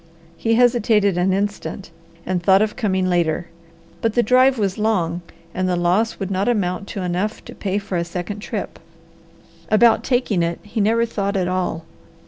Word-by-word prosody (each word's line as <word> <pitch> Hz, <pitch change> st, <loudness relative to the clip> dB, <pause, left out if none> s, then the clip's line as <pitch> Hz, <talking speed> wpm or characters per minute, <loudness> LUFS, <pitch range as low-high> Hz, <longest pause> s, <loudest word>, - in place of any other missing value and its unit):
He 225 Hz, +4 st, +1 dB
hesitated 225 Hz, -5 st, +3 dB
an 180 Hz, +2 st, +1 dB
instant, 200 Hz, -1 st, -3 dB, 0.3 s
and 185 Hz, -1 st, -1 dB
thought 190 Hz, +3 st, +5 dB
of 215 Hz, -, -2 dB
coming 190 Hz, -4 st, 0 dB
later; 175 Hz, -1 st, 0 dB, 0.5 s
but 225 Hz, -1 st, 0 dB
the 240 Hz, -, +4 dB
drive 255 Hz, +3 st, +4 dB
was 200 Hz, -2 st, -1 dB
long 180 Hz, -6 st, 0 dB, 0.3 s
and 185 Hz, 0 st, -1 dB
the 180 Hz, -, +1 dB
loss 180 Hz, +6 st, +1 dB
would 195 Hz, -1 st, -3 dB
not 195 Hz, +4 st, 0 dB
amount 200 Hz, -3 st, -1 dB
to 195 Hz, -, -5 dB
enough 180 Hz, +4 st, -2 dB
to -, -, -9 dB
pay 195 Hz, -1 st, -2 dB
for 200 Hz, -3 st, -3 dB
a -, -, 0 dB
second 180 Hz, +4 st, -5 dB
trip. 210 Hz, -, -5 dB, 0.9 s
About 225 Hz, +2 st, +4 dB
taking 245 Hz, -7 st, +1 dB
it, 170 Hz, 0 st, -1 dB
he 210 Hz, +1 st, -3 dB
never 230 Hz, +3 st, +3 dB
thought 200 Hz, -3 st, -2 dB
at 180 Hz, -2 st, 0 dB
all. 180 Hz, -3 st, -2 dB
200 Hz, 175 wpm, -21 LUFS, 180-220 Hz, 0.9 s, thought